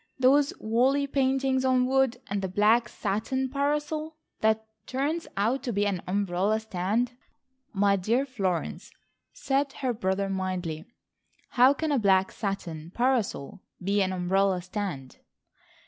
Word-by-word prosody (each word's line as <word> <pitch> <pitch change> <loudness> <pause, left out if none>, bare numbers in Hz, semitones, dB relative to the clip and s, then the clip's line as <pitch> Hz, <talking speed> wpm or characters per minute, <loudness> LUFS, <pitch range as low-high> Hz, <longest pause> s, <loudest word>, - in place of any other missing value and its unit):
Those 275 +2 +4
woolly 255 +6 +2
paintings 265 -1 +1
on 255 -1 +3
wood, 265 -1 +2
and 200 0 -2
the 190 - -1
black 215 +5 +3
satin 260 +6 -2
parasol 300 +3 -1 0.2
that 220 0 +2 0.2
turns 290 +6 -2
out 230 +7 +1
to 245 - -3
be 205 -1 +1
an 195 -4 -1
umbrella 200 +2 +1
stand." 220 +4 -1 0.6
"My 200 -1 +3
dear 230 +8 +1
Florence," 195 -10 -3 0.4
said 275 0 -1
her 260 -4 -2
brother 195 -3 -1
mildly, 185 -4 -3 0.6
"how 260 +3 +5
can 315 +1 -2
a 280 - +2
black 190 -3 +3
satin 170 -6 -4
parasol 235 - 0 0.2
be 200 +2 +1
an 190 -1 +1
umbrella 185 0 +1
stand?" 180 -9 -5
220 Hz, 130 wpm, -27 LUFS, 190-265 Hz, 0.6 s, how